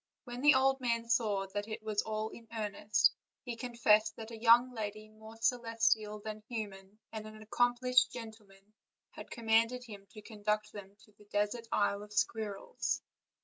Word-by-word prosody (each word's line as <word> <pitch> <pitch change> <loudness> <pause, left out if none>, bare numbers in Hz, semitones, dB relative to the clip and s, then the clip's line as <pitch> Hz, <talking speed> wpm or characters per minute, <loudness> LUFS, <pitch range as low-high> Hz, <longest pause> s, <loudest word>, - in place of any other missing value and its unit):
When 245 0 -7
the 295 0 +7
old 265 0 +3
man 230 -2 0
saw 210 -4 +1
that 205 +1 -2
it 215 0 -6
was 215 -1 0
all 215 0 -3
in, 230 0 -13
earnest, 215 -1 +2 0.3
he 240 -2 -4
confessed 225 -2 +3
that 225 0 -8
a 225 -1 -9
young 240 +2 +6
lady 215 -1 -5
more 220 +1 -13
celestial 225 -2 +1
than 215 0 -7
human, 205 -3 -6
and 215 -1 -6
an 215 0 -11
accomplished 245 +3 +2
gentleman, 215 -3 -11 0.4
had - - -10
com 235 -2 -8
manded 230 +3 +3
him 205 -4 -11
to 215 0 -13
conduct 210 -1 -2
them 200 -1 -10
to - - -24
the 210 - -17
desert 210 +3 -1
Isle 205 0 +1
of 210 0 -11
Squir 210 0 0
rels. 480 - -3
220 Hz, 175 wpm, -33 LUFS, 210-235 Hz, 0.4 s, the